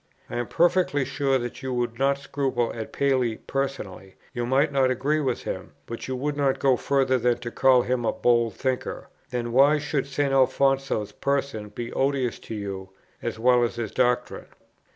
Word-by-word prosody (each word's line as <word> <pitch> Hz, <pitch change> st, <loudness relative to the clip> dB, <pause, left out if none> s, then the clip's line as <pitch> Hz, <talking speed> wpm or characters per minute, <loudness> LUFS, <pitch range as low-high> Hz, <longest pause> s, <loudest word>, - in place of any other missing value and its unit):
I -, -, -3 dB
am 120 Hz, -, -2 dB
perfectly 175 Hz, -5 st, +2 dB
sure 135 Hz, -1 st, +1 dB
that 120 Hz, -1 st, -5 dB
you 130 Hz, -1 st, -4 dB
would 120 Hz, -1 st, -2 dB
not 140 Hz, +1 st, +2 dB
scruple 135 Hz, -4 st, -1 dB
at 110 Hz, -1 st, -6 dB
Paley 130 Hz, -5 st, +1 dB
personally; 120 Hz, -9 st, -4 dB, 0.2 s
you 120 Hz, -2 st, -2 dB
might 140 Hz, +4 st, +2 dB
not 135 Hz, -2 st, +3 dB
agree 135 Hz, +5 st, +1 dB
with 130 Hz, -5 st, -1 dB
him, -, -, -5 dB
but 115 Hz, -, -6 dB
you 130 Hz, -, -2 dB
would 145 Hz, +3 st, -2 dB
not 140 Hz, -2 st, +1 dB
go 135 Hz, -2 st, +3 dB
further 130 Hz, 0 st, +1 dB
than 120 Hz, 0 st, +2 dB
to 120 Hz, -1 st, -6 dB
call 130 Hz, -1 st, +4 dB
him 125 Hz, -1 st, -1 dB
a -, -, +2 dB
bold 120 Hz, -3 st, +2 dB
thinker: 130 Hz, -1 st, -3 dB, 0.2 s
then 120 Hz, -1 st, -3 dB
why 140 Hz, +5 st, +5 dB
should 150 Hz, -2 st, -2 dB
St. 140 Hz, 0 st, 0 dB
Alfonso's 135 Hz, -4 st, +2 dB
person 140 Hz, -6 st, -2 dB
be 115 Hz, +3 st, -6 dB
odious 135 Hz, -3 st, 0 dB
to 110 Hz, -, -7 dB
you, 100 Hz, -2 st, -5 dB, 0.3 s
as -, -, -3 dB
well 125 Hz, +1 st, +4 dB
as 120 Hz, -, -1 dB
his 115 Hz, -3 st, -4 dB
doctrine? 125 Hz, -1 st, 0 dB
130 Hz, 185 wpm, -25 LUFS, 120-140 Hz, 0.3 s, why